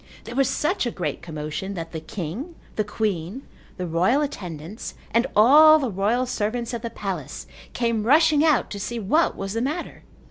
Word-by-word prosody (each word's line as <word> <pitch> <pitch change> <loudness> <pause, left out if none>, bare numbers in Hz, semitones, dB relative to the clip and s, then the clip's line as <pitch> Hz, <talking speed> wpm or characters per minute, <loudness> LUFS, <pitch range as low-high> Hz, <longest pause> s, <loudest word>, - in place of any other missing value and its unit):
There 230 - -8
was 270 -1 +3
such 305 -3 0
a - - +1
great 185 -6 -4
commotion 155 +5 -5
that 165 -2 -6
the 160 - -4
king, 195 - -6 0.2
the 215 - +1
queen, 210 +1 -3 0.3
the 180 - -3
royal 185 - +2
attendants 180 - -6 0.2
and 235 +3 +2
all 300 +8 +8
the 265 -7 -2
royal 210 +7 +1
servants 235 0 -2
of 235 - -3
the 235 - -4
palace 190 - -5 0.3
came 230 -2 0
rushing 305 +1 +5
out 310 -5 +2
to 205 - -5
see 235 +4 -4
what 265 - +2
was 195 0 -4
the 230 - -1
matter. 300 +7 -3
225 Hz, 180 wpm, -24 LUFS, 185-270 Hz, 0.3 s, all